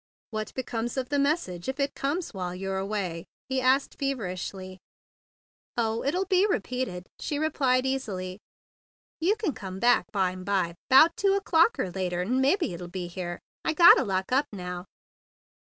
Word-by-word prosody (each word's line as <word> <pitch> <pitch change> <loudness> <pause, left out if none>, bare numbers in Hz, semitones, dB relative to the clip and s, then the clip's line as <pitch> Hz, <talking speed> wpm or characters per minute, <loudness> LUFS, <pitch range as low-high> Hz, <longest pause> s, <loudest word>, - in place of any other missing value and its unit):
"What 215 -1 -4
becomes 240 -1 -3
of 255 -1 -2
the 285 -1 +1
message 275 - 0
if 265 +2 -4
it 280 0 0
comes 300 +4 -2
while 180 -2 -4
you're 190 +1 -3
away?" 190 -4 -3 0.2
he 265 0 0
asked 260 +2 +2
feverishly. 190 -7 -4 1.0
"Oh, 225 -1 0
it'll 355 +8 0
be 380 +1 +3
repeated," 250 - -2
she 290 - -2
replied 270 -4 +1
easily. 200 -9 -3 0.8
"You 360 +6 +2
c'n 425 -9 -2
cumbback 195 +6 +1
bime 185 -2 -1
by, 185 -3 0 0.2
'bout 310 +6 +7
two 395 0 +2
o'clock 395 +2 +3
er 180 - -2
later, 180 -1 -2
'n' 250 +7 +1
mebbe 325 +8 +3
it'll 175 - -4
be 180 0 -5
here. 175 0 -5 0.3
I 320 - +1
gotta 340 +2 +8
lock 190 0 -2
up 275 +3 +3
now." 180 -2 -6
230 Hz, 155 wpm, -27 LUFS, 185-280 Hz, 1.0 s, gotta